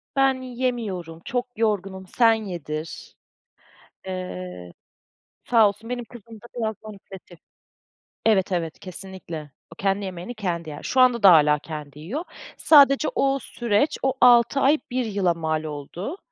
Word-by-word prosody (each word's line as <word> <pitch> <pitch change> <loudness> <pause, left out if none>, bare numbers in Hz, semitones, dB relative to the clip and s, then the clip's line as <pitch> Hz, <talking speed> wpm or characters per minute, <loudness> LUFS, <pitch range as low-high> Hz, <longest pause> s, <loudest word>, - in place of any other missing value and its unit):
Ben 270 -1 +2
yemiyorum, 235 -10 -4
çok 245 +1 -2
yorgunum, 195 -4 -1
sen 230 +3 +4
yedir. 170 -7 -6 0.9
Eee, 90 - -6 0.7
sağ 225 -3 +5
olsun 210 +4 -8
benim 245 -1 -3
kızım 230 -1 -13
da 235 - -13
biraz 220 -2 -1
manipülatif. 195 -4 -12 0.9
Evet, 200 -4 +3
evet 165 -3 -2
kesinlikle, 180 -5 -8 0.2
o - - -19
kendi 195 +2 -1
yemeğini 185 +5 -6
kendi 170 -6 -3
yer. 145 - -9
Şu 260 - 0
anda 245 -3 +4
da 195 - +9
hâlâ 150 -2 +5
kendi 150 -2 -8
yiyor. 225 - -5 0.3
Sadece 280 -1 +6
o 275 0 +1
süreç 235 +4 0
o 265 -1 +2
6 240 +2 +6
ay, 280 +3 +4
1 255 0 -1
yıla 200 -5 +1
mal 160 -1 -2
oldu. 155 - -6
200 Hz, 140 wpm, -24 LUFS, 170-240 Hz, 0.9 s, da